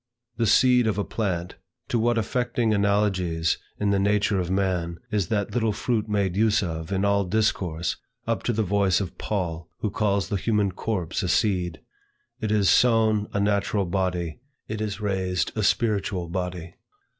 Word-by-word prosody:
The 115 -1 +1
seed 125 +2 +5
of 105 - 0
a 105 - +1
plant, 90 -6 -3 0.3
to 120 - +1
what 120 +1 +2
affecting 120 0 0
analogies 95 -5 +1 0.2
in 105 -1 +1
the 100 - +2
nature 100 0 +2
of 90 -1 -2
man, 90 -3 0
is 105 -5 0
that 100 0 -1
little 115 -3 +1
fruit 110 0 -1
made 100 -3 0
use 110 0 +3
of, 80 -1 -4
in 95 +1 +1
all 100 0 +3
discourse, 90 -4 0 0.3
up 115 -4 -1
to - - +2
the 110 -1 0
voice 100 -2 +2
of 95 -3 -5
Paul, 85 -5 -3
who 105 - -1
calls 100 -2 0
the 100 - 0
human 105 0 +1
corpse 90 -3 -2
a 90 - -1
seed, 90 -3 +1 0.6
"It 110 - -2
is 105 -3 +3
sown 110 +1 +4
a 100 - -1
natural 100 0 +1
body; 90 -3 -2 0.3
it 110 0 -4
is 105 -1 -3
raised 95 -5 -1
a - - -1
spiritual 100 -6 0
body." 90 -1 -4
100 Hz, 170 wpm, -25 LUFS, 90-110 Hz, 0.6 s, seed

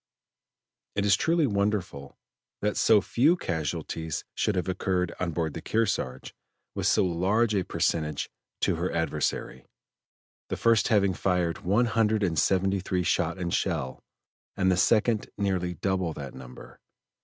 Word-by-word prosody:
It 100 - 0
is 100 -2 +5
truly 165 - +2
wonderful 100 - -2 0.5
that 105 0 +1
so 110 -2 +5
few 145 - +3
casualties 80 - -3
should 105 - 0
have 90 -1 -1
occurred 90 -1 -1
on 90 - -1
board 80 -2 -2
the - - -6
Kearsarge 95 - -1 0.4
with - - -1
so - - +3
large 100 +6 +1
a 100 - +2
percentage 75 -4 -1 0.3
to - - +1
her 90 +2 -1
adversary 80 -3 -2 0.9
the - - -2
first 115 -2 +3
having 100 -4 +3
fired 90 -2 0
one 105 +7 +2
hundred 110 -2 +1
and 85 -5 +1
seventy 95 +2 +2
three 90 -1 -1
shot - - 0
and 85 -2 -3
shell, 65 0 -2 0.5
and 95 -1 +3
the - - +3
second 105 +5 +2
nearly 95 -3 -1
double 95 -1 -1
that 70 -4 -7
number. 65 -1 -12
95 Hz, 145 wpm, -27 LUFS, 85-105 Hz, 0.9 s, is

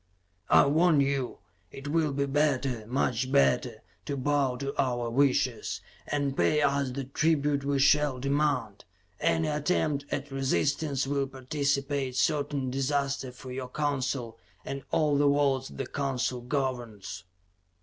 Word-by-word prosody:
"I - - +7
warn 160 +2 +4
you, 140 -2 0 0.3
it 135 +1 -9
will 155 0 +1
be 140 0 0
better, 135 -5 0
much 130 0 0
better, 70 -1 +2 0.2
to 140 - -3
bow 135 -1 +1
to 140 +2 -4
our 120 -3 -1
wishes, 125 -3 +1 0.3
and 140 -2 -1
pay 150 +1 +2
us 140 -1 +1
the 135 +2 -4
tribute 145 +1 +1
we 140 0 0
shall 145 0 +4
demand. 140 -6 0 0.4
Any 165 -1 +1
attempt 150 -1 0
at 135 +1 -3
resistance 140 +1 0
will 140 0 0
precipitate 140 0 -1
certain 140 -2 0
disaster 135 0 -1
for 125 +1 -10
your 130 0 -5
Council 130 -5 -2 0.3
and 140 0 -4
all 150 -2 +2
the 145 - +4
worlds 140 -2 +2
the 135 - -5
Council 130 -2 -2
governs." 120 - -3
140 Hz, 135 wpm, -28 LUFS, 130-145 Hz, 0.4 s, I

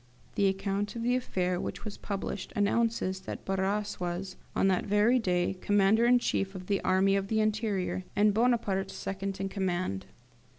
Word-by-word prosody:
The 200 - +2
account 195 +2 -1
of 230 - -3
the 245 +1 +2
affair 185 -7 -1
which - - -5
was 210 - -5
published 200 -1 -4
announces 205 -2 +1
that 190 - -7
Barras 195 +2 -1
was, 180 +1 -3 0.2
on - - +3
that 185 -2 +2
very 210 +5 +4
day, 180 -3 0
Commander 205 +3 +4
in 245 0 +6
chief 195 -5 -1
of 185 -1 -7
the 200 +1 0
Army 190 +1 +3
of 195 0 0
the 220 +1 +1
Interior, 215 -4 0
and 210 0 +4
Bonaparte 215 -4 +1
second 195 0 -4
in 195 - -1
command. 185 - -2
195 Hz, 170 wpm, -30 LUFS, 190-215 Hz, 0.2 s, in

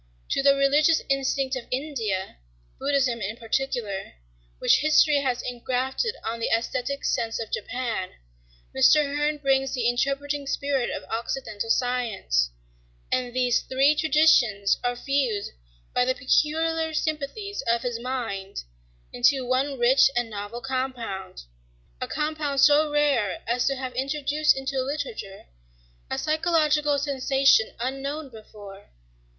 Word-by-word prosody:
"To - - +2
the 275 0 +5
religious 290 +4 +3
instinct 275 0 0
of 255 - -6
India—Buddhism 235 - -3
in 210 +3 -4
particular,—which 195 - -2
history 305 0 +4
has 260 -3 -1
engrafted 255 - -2
on 230 +1 -3
the 230 - -1
aæsthetic 250 +4 -1
sense 225 -1 -1
of 225 - -6
Japan, 230 -5 -3 0.6
Mr. 300 - +5
Hearn 295 +1 0
brings 270 -2 +1
the 240 -2 0
interpreting 275 +3 -1
spirit 275 -3 -1
of - - -5
occidental 225 -1 -4
science; 225 - 0 0.6
and 250 -1 0
these 250 -2 +2
three 270 +3 +3
traditions 290 -10 +3
are 245 0 0
fused 245 -6 -1 0.4
by 250 - +3
the 255 +1 +1
peculiar 320 +3 +1
sympathies 315 +8 -3
of 235 0 +1
his 240 -2 -3
mind 225 - -4 0.5
into 255 +2 +3
one 265 +2 0
rich 255 +3 +5
and 240 -2 -1
novel 205 +3 -6
compound,—a - - -6
compound 300 -2 -2
so 295 +2 +5
rare 285 -9 +1
as 240 +1 0
to 275 - +1
have 260 -1 -5
introduced 290 +3 +1
into 270 0 -2
literature 275 - -5 0.6
a - - -2
psychological 305 -2 +2
sensation 270 -4 +2
unknown 275 +4 -4
before." 205 -3 -13
260 Hz, 120 wpm, -25 LUFS, 230-285 Hz, 0.6 s, the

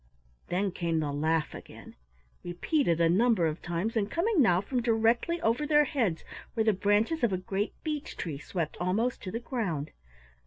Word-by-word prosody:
Then 190 +2 0
came 170 -2 -1
the 150 -2 -1
laugh 155 +1 0
again, - - -11 0.5
repeated 175 - 0
a 165 - +4
number 200 +1 +3
of 155 +1 -2
times 175 +7 -2
and 210 -2 0
coming 350 - +2
now 180 -8 +4
from 245 +6 -2
directly 230 +8 +2
over 240 +5 +1
their 295 -1 +5
heads 225 - -1 0.3
where 225 - +2
the 220 -1 +3
branches 205 - +1
of 235 - +3
a 185 - 0
great 195 +3 -3
beech 305 -1 -4
tree 150 -5 -4
swept 165 0 -4
almost 215 +8 0
to 185 - -6
the 230 - -3
ground. 195 - -3
205 Hz, 180 wpm, -29 LUFS, 170-240 Hz, 0.5 s, their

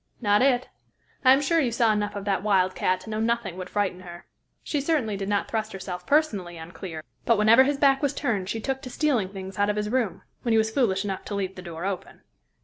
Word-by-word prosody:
"Not 205 -2 +3
it. 255 -2 +3 0.6
I 260 - +7
am 270 +2 +5
sure 330 +3 +2
you 255 -6 +1
saw 230 -1 +3
enough 210 -1 -2
of 200 -1 -5
that 195 -3 0
wildcat 185 -2 +1
to 205 - -11
know 215 - -2
nothing 230 -4 -1
would 185 - -6
frighten 200 -3 -1
her. 175 -1 -11 0.4
She 290 - -1
certainly 275 -8 0
did 195 0 -4
not 205 -1 0
thrust 220 -1 -3
herself 190 -2 -6
personally 210 - +1
on 160 +1 -9
Clear, 165 -2 -7 0.2
but 230 -2 +3
whenever 225 +5 +6
his 285 +1 0
back 275 -1 +4
was 285 -2 0
turned 195 -5 -1
she 225 - -2
took 265 +3 -3
to 255 - -7
stealing 245 -8 0
things 190 0 -8
out 205 0 +3
of 210 - 0
his 210 0 -2
room, 230 -7 -1 0.2
when 235 - 0
he - - +5
was 220 0 +2
foolish 210 -6 +1
enough 195 -2 -3
to 205 - -4
leave 190 -1 -2
the 180 - -9
door 170 -1 -6
open. 195 -2 -5
210 Hz, 240 wpm, -26 LUFS, 190-245 Hz, 0.6 s, I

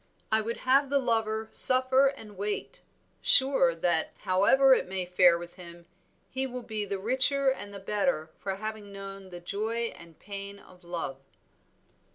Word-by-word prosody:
"I 220 0 +3
would 230 +2 -4
have 270 +2 +2
the 280 - +2
lover 220 -4 0
suffer 260 +1 +6
and 220 -7 -7
wait; 210 - -5 0.4
sure 265 -11 +4
that, 165 -1 +1
however 210 +8 +4
it - - 0
may 185 -1 -4
fare 180 -1 +4
with 175 +1 -11
him, 170 -1 -12 0.4
he 265 +1 -2
will 250 -1 -7
be 215 -2 -3
the 200 0 -4
richer 260 +6 +1
and 205 -6 -7
the 200 - -9
better 195 - -2
for 195 -1 -4
having 215 0 -7
known 195 -1 -9
the 175 -1 -9
joy 220 +6 -4
and 165 -1 -16
pain 200 0 -8
of 185 -2 -19
love." 170 -6 -5
205 Hz, 165 wpm, -27 LUFS, 185-255 Hz, 0.4 s, suffer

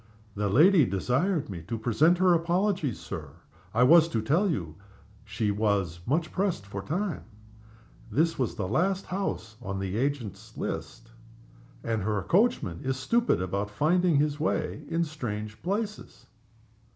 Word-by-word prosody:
"The 105 0 -1
lady 160 - +6
desired 130 - 0
me 90 -5 -6
to 115 - -3
present 140 +10 +3
her 180 0 +4
apologies, 170 - 0
Sir. 80 -7 -7 0.4
I 115 +4 +3
was 165 +5 +7
to 115 - -1
tell 170 - +2
you 85 - -3 0.5
she 105 0 -1
was 100 -5 0
much 155 +5 0
pressed 185 - -1
for 100 0 -6
time. 175 - -3 0.9
This 165 +2 +1
was 125 -5 -1
the - - -3
last 190 - 0
house 180 - -4
on 95 -3 -4
the 95 -1 -3
house 110 +5 -1
agent's 135 -8 -4
list, 115 -1 -5 0.7
and 115 -1 -1
her 105 0 -1
coachman 180 - +1
is 130 0 -1
stupid 230 - +1
about 100 +3 -2
finding 165 +9 +2
his 150 +1 +1
way 155 - -1
in 165 +1 +1
strange 110 -9 -5
places." 210 +3 -4
130 Hz, 150 wpm, -28 LUFS, 105-175 Hz, 0.9 s, was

